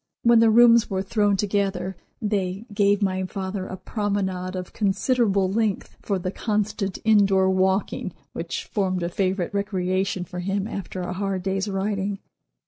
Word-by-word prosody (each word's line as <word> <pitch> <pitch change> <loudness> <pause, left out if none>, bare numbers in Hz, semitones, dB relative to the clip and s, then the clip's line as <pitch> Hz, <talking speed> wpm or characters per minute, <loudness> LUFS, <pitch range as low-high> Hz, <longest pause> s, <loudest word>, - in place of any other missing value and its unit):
When 235 -1 +6
the 225 0 +6
rooms 235 0 +6
were 190 -1 -1
thrown 205 0 +1
together 195 -2 -1 0.2
they 200 -2 -2
gave 205 0 +3
my 190 -1 0
father 190 0 -4
a 185 - -6
promenade 190 -3 -2
of 180 -1 -6
considerable 200 -1 +2
length 215 -1 -1
for 200 - -1
the 185 0 -3
constant 210 -3 -1
indoor 195 -3 +4
walking 190 +1 0 0.2
which - - -4
formed 185 -3 -1
a 170 - -1
favorite 185 0 -1
recreation 190 -1 -1
for 180 +1 -7
him 195 +2 -1
after 195 -3 -5
a 180 0 -3
hard 195 -1 -2
day's 195 +1 -1
writing. 195 0 -1
195 Hz, 150 wpm, -24 LUFS, 185-205 Hz, 0.2 s, When